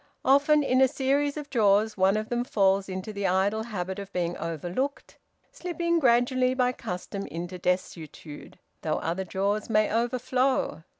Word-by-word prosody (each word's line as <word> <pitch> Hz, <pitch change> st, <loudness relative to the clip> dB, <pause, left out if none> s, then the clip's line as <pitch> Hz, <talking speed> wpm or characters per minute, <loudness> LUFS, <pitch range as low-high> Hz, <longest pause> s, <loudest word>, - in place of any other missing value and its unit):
Often, 290 Hz, +3 st, +4 dB
in 255 Hz, -1 st, +2 dB
a 265 Hz, -, +7 dB
series 280 Hz, +2 st, 0 dB
of 295 Hz, -2 st, -7 dB
drawers, 215 Hz, -2 st, +3 dB
one 195 Hz, +2 st, +3 dB
of 215 Hz, 0 st, -4 dB
them 240 Hz, 0 st, 0 dB
falls 195 Hz, -4 st, +1 dB
into 190 Hz, +3 st, -5 dB
the 200 Hz, -1 st, -1 dB
idle 195 Hz, +4 st, +1 dB
habit 190 Hz, -3 st, -4 dB
of 200 Hz, -1 st, -8 dB
being 175 Hz, -1 st, -2 dB
overlooked, 175 Hz, -, -4 dB, 0.3 s
slipping 340 Hz, -1 st, -1 dB
gradually 255 Hz, 0 st, +3 dB
by 250 Hz, -1 st, +2 dB
custom 195 Hz, -2 st, -6 dB
into 175 Hz, +2 st, -6 dB
desuetude, 165 Hz, -4 st, -4 dB, 0.2 s
though 155 Hz, -1 st, -1 dB
other 170 Hz, +4 st, -2 dB
drawers 200 Hz, +4 st, -2 dB
may 215 Hz, -1 st, +2 dB
overflow. 250 Hz, -1 st, 0 dB
215 Hz, 155 wpm, -27 LUFS, 190-255 Hz, 0.3 s, a